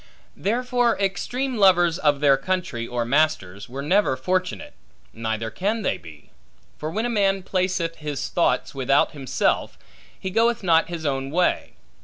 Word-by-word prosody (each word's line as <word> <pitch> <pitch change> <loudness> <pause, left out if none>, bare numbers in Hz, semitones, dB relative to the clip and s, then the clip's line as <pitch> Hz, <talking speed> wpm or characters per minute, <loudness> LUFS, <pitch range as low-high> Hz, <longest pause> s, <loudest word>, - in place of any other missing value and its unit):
Therefore 245 +2 +1
extreme 245 +7 -1
lovers 175 -4 +4
of 145 -2 +2
their 140 -2 +6
country 135 -6 -3
or 120 -1 -2
masters, 115 -9 0
were 135 +3 -5
never 180 -4 +2
fortunate, 180 +6 -2 0.4
neither 110 0 -3
can 205 - -1
they - - -1
be. 75 -3 -14 0.5
For 155 - -3
when 220 +8 -2
a - - +1
man 195 -4 +1
placeth 185 -3 -1
his 150 -2 -4
thoughts 175 - +1
without 135 +1 +2
himself, 135 -4 -1 0.4
he 190 - -4
goeth 230 +1 +2
not 165 -2 +3
his 170 -2 -5
own 135 -1 -1
way. 175 +5 0
165 Hz, 150 wpm, -23 LUFS, 135-195 Hz, 0.5 s, their